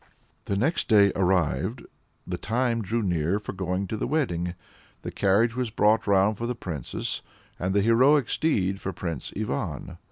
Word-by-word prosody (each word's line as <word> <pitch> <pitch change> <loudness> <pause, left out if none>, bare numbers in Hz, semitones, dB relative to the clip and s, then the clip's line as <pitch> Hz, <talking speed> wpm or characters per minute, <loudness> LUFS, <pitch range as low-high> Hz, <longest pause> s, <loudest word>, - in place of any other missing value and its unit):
The 100 - -1
next 150 - 0
day 100 -3 +6
arrived; 90 -5 0 0.4
the - - -4
time 115 +1 0
drew 115 +3 -1
near 90 0 +1
for 105 - -6
going 95 0 -2
to 110 - -4
the - - -2
wedding. 90 - -1 0.5
The - - -4
carriage 110 +4 +2
was 125 -2 -1
brought 110 +1 +2
round 100 +1 +3
for 120 - -2
the 125 - -2
Princess, 80 - -4 0.4
and 95 +2 -1
the 100 - +3
heroic 130 +4 +4
steed 95 - 0
for 95 - -3
Prince 85 -4 -5
Ivan. 105 - -3
100 Hz, 165 wpm, -26 LUFS, 90-115 Hz, 0.5 s, day